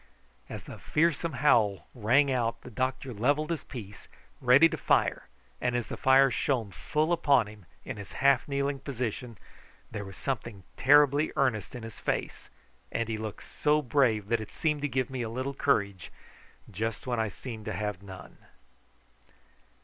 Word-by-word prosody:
As - - -7
the - - -10
fearsome 165 0 +1
howl 105 -8 +4
rang 130 +5 +3
out 115 -2 0
the 125 - -11
doctor 130 +3 -2
levelled 145 +9 +1
his 160 -4 -2
piece, 105 -7 -9 0.3
ready 130 +5 +7
to - - -4
fire, - - +1 0.3
and 125 0 0
as 120 -2 0
the - - -4
fire 135 0 +5
shone 115 -4 0
full 155 - 0
upon 145 -8 +4
him 105 -3 -13 0.2
in - - -5
his 100 -2 -9
half 140 -2 +3
kneeling 140 0 -1
position 125 -3 -4 0.5
there 105 - -4
was 95 -1 -10
something 120 -7 -4
terribly 145 +2 +5
earnest 125 -3 0
in 120 - -7
his 115 -1 -9
face, - - -3 0.4
and 115 -1 -2
he 110 -1 -2
looked 110 -2 -6
so 150 0 +1
brave 120 -6 +2
that 115 -1 +1
it 110 - -8
seemed 150 -2 -1
to 145 - 0
give 130 -2 -1
me 130 -2 -3
a 115 - -3
little 130 +4 -3
courage 100 -10 0 0.6
just 110 +3 -3
when 120 -2 -1
I 110 - +1
seemed 110 +1 -8
to 110 - -3
have 105 0 -3
none. 95 -2 -11
125 Hz, 170 wpm, -29 LUFS, 110-140 Hz, 0.6 s, ready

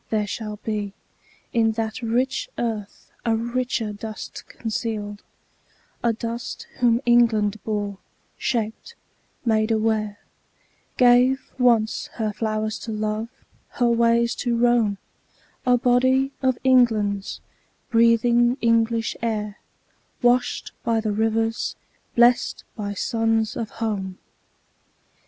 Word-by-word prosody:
There 215 -1 +1
shall 210 0 -5
be 210 -2 -3 0.6
In 225 -1 +3
that 220 +1 -3
rich 255 - 0
earth 220 -4 -4
a 230 -2 +2
richer 235 -1 -1
dust 215 +1 -8
concealed; 215 -2 -4 0.8
A 235 - +3
dust 230 +1 -5
whom 240 -1 +3
England 220 -4 +3
bore, 205 -2 -3 0.4
shaped, 230 - -3 0.5
made 220 -1 +2
aware, 215 -2 0 0.8
Gave, 250 +2 +4
once, 230 -3 +3
her 215 -2 -2
flowers 215 0 -2
to 225 - -6
love, 215 +1 -2 0.4
her 245 -4 +2
ways 235 0 +3
to 240 -2 0
roam, 235 -4 +3 0.7
A 250 0 +5
body 260 +2 +3
of 260 -2 +2
England's, 220 -6 +2 0.5
breathing 235 +1 +4
English 230 -1 +2
air, 210 -2 -2 0.6
Washed 245 +1 +2
by 230 -1 +1
the 215 -1 -1
rivers, 225 +1 0 0.4
blest 240 +1 +4
by 205 -2 -4
suns 225 +1 0
of 225 -2 -3
home. 200 -5 -3
225 Hz, 105 wpm, -23 LUFS, 215-240 Hz, 0.8 s, A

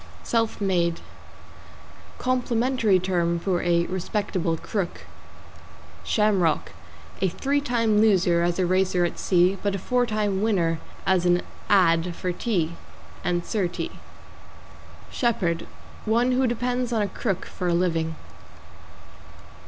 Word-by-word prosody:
=SELF 225 -1 0
MADE= 175 -4 +1 1.2
Complimentary 250 -4 +1
term 175 -2 0
for 175 0 -1
a 170 -1 +2
respectable 185 -2 -2
crook. 195 0 -3 1.0
=SHAMROCK= 195 -7 +1 0.5
A 190 - +3
three 280 +10 0
time 230 -6 +2
loser 185 -5 +3
as 175 0 0
a 185 - +2
racer 185 0 +2
at 175 - -4
sea, 185 +1 +3
but 200 -1 0
a - - -1
four 245 +6 0
time 210 -3 0
winner 175 -7 +1 0.3
as 180 -2 +2
an 175 0 +3 0.3
"ad." 175 -3 +3
for 180 - -2
tea 175 -4 -1 0.5
and 175 -1 -1
Sir 200 -5 0
T. 175 - -5 1.2
=SHEPHERD= 180 -9 0 0.4
One 235 +3 +2
who 255 +1 +2
depends 245 +1 -1
on 220 -3 +1
a - - 0
crook 195 -1 -3
for 180 - -5
a 175 - +2
living. 165 -2 0
190 Hz, 125 wpm, -25 LUFS, 175-225 Hz, 1.2 s, A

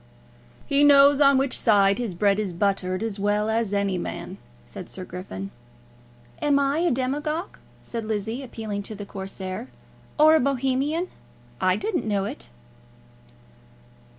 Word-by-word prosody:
"He 280 +1 +2
knows 285 0 +7
on 275 -1 +6
which 270 0 +1
side 200 -2 +4
his 225 -7 -3
bread 200 +2 +2
is 200 -4 -2
buttered 185 +1 -1
as 215 -3 -3
well 210 +2 +1
as 225 -2 0
any 200 -2 0
man," - - -6 0.3
said - - -9
Sir 185 - -7
Griffin. 100 - -7 0.9
"Am 290 -1 +3
I 280 +2 +1
a 350 +1 +2
demagogue," 295 +7 -2 0.2
said 230 -1 -5
Lizzie, 220 +3 -3
appealing 220 -5 -5
to 215 +2 -8
the 205 0 -7
Corsair, 195 +2 -6 0.5
"or 310 +1 +7
a 320 - +5
Bohemian? 275 +5 0 0.5
I 185 0 +3
didn't 350 - -2
know 200 -2 0
it." - - -7
220 Hz, 145 wpm, -24 LUFS, 195-275 Hz, 0.9 s, knows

